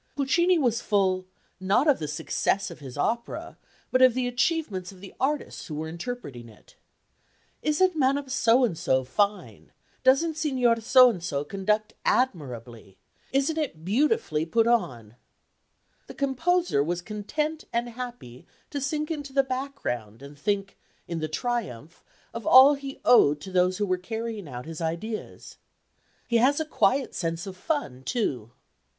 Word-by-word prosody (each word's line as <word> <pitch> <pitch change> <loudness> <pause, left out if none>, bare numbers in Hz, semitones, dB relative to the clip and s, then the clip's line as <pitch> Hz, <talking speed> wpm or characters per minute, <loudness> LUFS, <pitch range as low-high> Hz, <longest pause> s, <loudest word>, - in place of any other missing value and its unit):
Puccini 345 +6 +3
was 240 -6 +1
full, 190 -3 +1 0.3
not 200 +10 +2
of 290 - +4
the 150 - -3
success 185 +4 -1
of 170 - -11
his 135 -3 -9
opera, 235 +10 -3 0.3
but 255 - +3
of 255 -2 +6
the 255 -1 0
achievements 245 - -1
of 190 - -15
the 195 0 -11
artists 285 +2 -2
who 155 - -6
were 155 +1 -4
interpreting 165 - -7
it. 110 - -20 0.9
"Isn't 330 +4 +2
Madame 275 -1 +1
So 255 -1 +3
and 200 -8 -2
so 130 -6 +1
fine?" 200 +11 -2 0.3
"Doesn't 300 +5 +3
Signor 255 -7 +1
So 255 +2 +7
and 180 -6 -8
so 140 -4 -2
conduct 210 +6 -1
admirably?" 125 - -2 0.3
"Isn't 280 +4 +1
it 165 - -4
beautifully 265 - +1
put 225 +8 +2
on?" 120 - -1 0.9
The - - -10
composer 285 - +1
was 175 +3 -3
content 300 - -3
and 235 +1 -1
happy 240 - -9 0.2
to 285 - -3
sink 300 +3 -2
into 290 -4 -5
the 275 0 +4
background 255 - -4
and 140 +1 -11
think, 195 +5 -2 0.3
in 170 -1 -3
the 155 - -2
triumph, 170 - -4 0.3
of 230 - -6
all 265 +3 +9
he 275 -1 -7
owed 150 -12 +6
to 190 - -8
those 180 0 +2
who 205 - 0
were 185 -2 0
carrying 220 -1 -5
out 125 -2 -7
his 165 0 -7
ideas. 170 +7 -5 0.7
He 235 - +2
has 270 +6 +3
a 315 - -1
quiet 275 -3 +1
sense 165 +1 -3
of 190 -1 -7
fun, 185 - -3
too. 130 - -2
220 Hz, 155 wpm, -26 LUFS, 165-270 Hz, 0.9 s, all